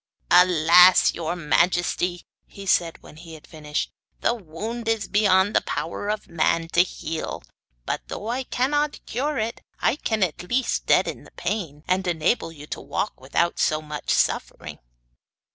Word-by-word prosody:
'Alas! 180 0 +6
your 170 +1 -3
majesty,' 175 +2 +1 0.2
he 200 - -11
said, 170 -3 +1
when 155 - -14
he 165 0 -11
had 155 - -14
finished, 150 -2 -4 0.3
'the - - +2
wound 220 +4 -6
is 225 -2 0
beyond 200 -1 +3
the - - +5
power 205 +5 -4
of 215 0 -3
man 165 0 0
to 175 - +4
heal; 165 - -4 0.4
but - - -2
though 210 - -6
I 245 +3 -1
cannot 290 +5 -1
cure 280 +5 -2
it, 225 +1 -3 0.2
I - - +2
can 220 -8 0
at 170 -5 -2
least 245 +8 -1
deaden - - +2
the - - -16
pain, 160 -9 -4
and 185 +1 0
enable 165 +2 0
you 150 -2 -11
to - - -6
walk 205 - -4
without 140 +6 0
so 155 - +2
much 150 -1 -7
suffering. - - -1
180 Hz, 160 wpm, -24 LUFS, 160-215 Hz, 0.4 s, Alas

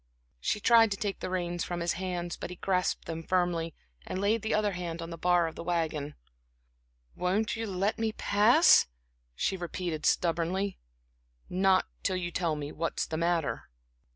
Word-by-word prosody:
She 210 - -1
tried 225 +1 +6
to 200 - -2
take 200 -1 -3
the - - -4
reins 175 -2 -2
from 175 -1 -3
his 170 0 0
hands, 175 -2 -3
but - - -6
he 180 - -7
grasped 185 0 0
them 165 0 -4
firmly, 170 -2 0 0.3
and 185 - -4
laid 210 +3 +2
the 220 - -2
other 210 -1 +1
hand 170 -2 -4
on 165 0 -6
the - - -4
bar 175 0 +3
of 165 - -4
the - - -7
wagon. 160 -4 -2 1.0
"Won't 195 +5 0
you 225 0 -3
let 195 +3 -1
me 225 -1 +1
pass?" 215 - +5 0.5
she 190 - 0
repeated 175 -3 -3
stubbornly. 175 +3 0 0.7
"Not 190 +1 +3 0.2
till 190 - 0
you 175 -1 -3
tell 170 -3 0
me 145 0 -5
what's 165 +1 -2
the 160 - -5
matter." 170 -2 -1
180 Hz, 175 wpm, -29 LUFS, 170-195 Hz, 1.0 s, tried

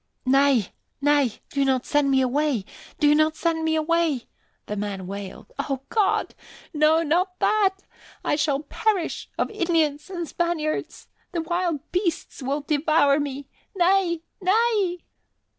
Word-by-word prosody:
"Nay, 270 -5 +3 0.3
nay, 285 -4 +3 0.2
do 280 - +1
not 260 -2 +1
send 290 -1 +2
me 265 -1 +4
away! 260 -4 0 0.3
Do 295 -2 +5
not 310 +1 +3
send 330 -1 0
me 320 0 +1
away!" 315 -4 +1 0.4
the 210 - -4
man 200 -2 -4
wailed. 195 - -8
"O 270 -2 -2
God! 420 -3 +1 0.4
No, 310 +2 +4
not 360 +4 0
that! 390 -3 +2 0.4
I - - +2
shall 290 -2 +1
perish 380 +2 -1
of - - -1
Indians 330 -6 0
and 345 -3 -4
Spaniards! 330 -3 -2 0.3
The 340 - 0
wild 345 -3 -1
beasts 360 -5 -2
will 275 +3 -1
devour 295 -1 +3
me. 280 -1 -4 0.3
Nay! 355 -2 +2 0.2
Nay!" 395 -2 +2
310 Hz, 135 wpm, -24 LUFS, 280-345 Hz, 0.4 s, Do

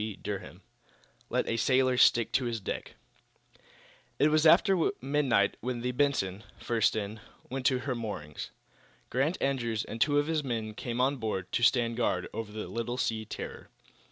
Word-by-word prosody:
CHAPTER 105 -1 -4
XII - - -18 0.7
LET - - 0
A 115 - 0
SAILOR 130 +3 +3
STICK 120 -2 +4
TO 130 - +1
HIS 115 -1 -2
DECK 95 - -5 1.2
It 150 - +4
was 155 +1 +4
after 185 +1 +5
midnight 135 -6 +2
when 120 0 -3
the 125 +1 -1
"Benson," 125 -8 0
first 115 -2 +1
in, 110 0 -3 0.3
went 130 0 0
to 130 - +3
her 135 -1 -2
moorings. 105 -11 -5 0.6
Grant 140 +8 +1
Andrews 120 -5 -1
and 115 - -7
two 145 +2 +4
of 145 - +3
his 155 -1 0
men 115 -4 -3
came 120 +2 -4
on 135 +2 +2
board, 105 -6 -3
to 120 - 0
stand 115 -1 +3
guard 120 - 0
over 110 -2 -5
the 105 -2 -5
little 115 +5 -3
sea 110 -3 -1
terror. - - -7
120 Hz, 170 wpm, -30 LUFS, 110-135 Hz, 1.2 s, after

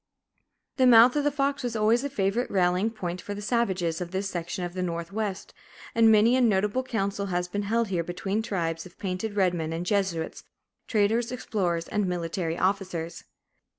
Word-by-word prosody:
The 260 -1 +5
mouth 240 +1 +8
of 295 - +1
the 290 - +3
Fox 280 0 -1
was 245 -3 -3
always 225 +3 +3
a 285 - -2
favorite 215 -1 0
rallying 185 +2 +2
point 180 -5 -5
for 205 - -6
the - - -6
savages 190 -8 0
of 175 - -4
this 190 +2 -2
section 175 0 -4
of 175 - -6
the 185 - -3
Northwest, 190 +4 -3 0.4
and 225 -1 +5
many 220 +3 +5
a 260 - +3
notable 210 +1 +2
council 200 -5 -2
has 180 -1 -1
been 205 +3 -3
held 230 -1 +1
here 175 -3 0
between 195 +5 -2
tribes 165 -5 -3
of 175 - -20
painted 195 +2 -3
red 185 -3 +3
men 160 -2 -3
and 165 +2 -3
Jesuits, 190 -5 -1 0.4
traders, 225 +3 +1
explorers, 180 -9 -2
and 210 -2 0
military 170 -1 -2
officers. 185 -3 -2
195 Hz, 185 wpm, -27 LUFS, 175-225 Hz, 0.4 s, mouth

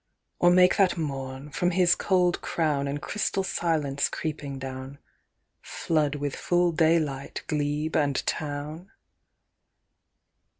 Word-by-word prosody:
"Or 175 - +5
make 180 +1 +5
that 190 -3 +3
morn, 135 -2 -5
from 175 +4 +1
his 180 -1 +4
cold 180 -2 +1
crown 150 -4 0
And 140 +1 -3
crystal 195 +2 -1
silence 155 -7 0
creeping 145 -3 -4
down, 130 +1 -7 0.6
Flood 150 -3 -1
with 145 -1 -3
full 175 0 +1
daylight 155 -4 0
glebe 150 +1 -1
and 145 -2 +2
town? 150 +4 -4
150 Hz, 115 wpm, -26 LUFS, 140-175 Hz, 0.6 s, Or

